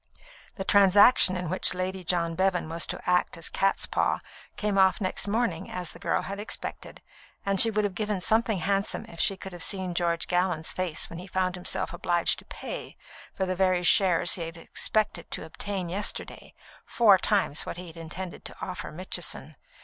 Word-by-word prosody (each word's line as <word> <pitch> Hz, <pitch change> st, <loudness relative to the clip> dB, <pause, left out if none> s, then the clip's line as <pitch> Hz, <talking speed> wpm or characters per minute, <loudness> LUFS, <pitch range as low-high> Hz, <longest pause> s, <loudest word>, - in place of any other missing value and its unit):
The 195 Hz, -, -4 dB
transaction 200 Hz, +1 st, +6 dB
in 180 Hz, -1 st, -4 dB
which 185 Hz, +2 st, +2 dB
Lady 185 Hz, +1 st, -3 dB
John 170 Hz, -1 st, 0 dB
Bevan 185 Hz, -1 st, 0 dB
was 165 Hz, +1 st, +1 dB
to -, -, -6 dB
act 180 Hz, -1 st, +1 dB
as 165 Hz, -, -4 dB
catspaw 195 Hz, 0 st, 0 dB, 0.4 s
came 205 Hz, -2 st, 0 dB
off 190 Hz, 0 st, +4 dB
next 190 Hz, 0 st, -2 dB
morning 230 Hz, +3 st, -1 dB
as 180 Hz, -2 st, -4 dB
the -, -, -13 dB
girl -, -, 0 dB
had 200 Hz, +1 st, -6 dB
expected, 210 Hz, -, -5 dB, 0.4 s
and 195 Hz, -1 st, +5 dB
she 230 Hz, -, +8 dB
would 215 Hz, -1 st, 0 dB
have 205 Hz, -2 st, -1 dB
given 210 Hz, +1 st, -2 dB
something 220 Hz, +2 st, +2 dB
handsome 195 Hz, +3 st, -1 dB
if 165 Hz, -, -13 dB
she 195 Hz, -1 st, +2 dB
could 190 Hz, -1 st, -9 dB
have 175 Hz, -, -8 dB
seen 185 Hz, -1 st, -1 dB
George 170 Hz, -2 st, +1 dB
Gallon's 180 Hz, -3 st, 0 dB
face 185 Hz, -4 st, -1 dB
when 165 Hz, -, -9 dB
he 180 Hz, -, -9 dB
found 185 Hz, -1 st, -1 dB
himself 180 Hz, -1 st, -2 dB
obliged 175 Hz, -1 st, +1 dB
to -, -, -16 dB
pay, -, -, -7 dB, 0.4 s
for 190 Hz, -, -1 dB
the 185 Hz, -, -1 dB
very 185 Hz, -1 st, +2 dB
shares 175 Hz, -1 st, +4 dB
he 180 Hz, -, -1 dB
had 165 Hz, 0 st, -5 dB
expected 200 Hz, +1 st, -1 dB
to -, -, -4 dB
obtain 190 Hz, +2 st, -5 dB
yesterday, 195 Hz, +4 st, -4 dB, 0.3 s
four 210 Hz, -5 st, +4 dB
times 195 Hz, -9 st, +1 dB
what -, -, -5 dB
he 180 Hz, -, -7 dB
had 165 Hz, -1 st, -11 dB
intended 170 Hz, +2 st, -7 dB
to -, -, -7 dB
offer 185 Hz, -, -6 dB
Mitchison. 185 Hz, +5 st, -3 dB
185 Hz, 190 wpm, -27 LUFS, 175-200 Hz, 0.4 s, she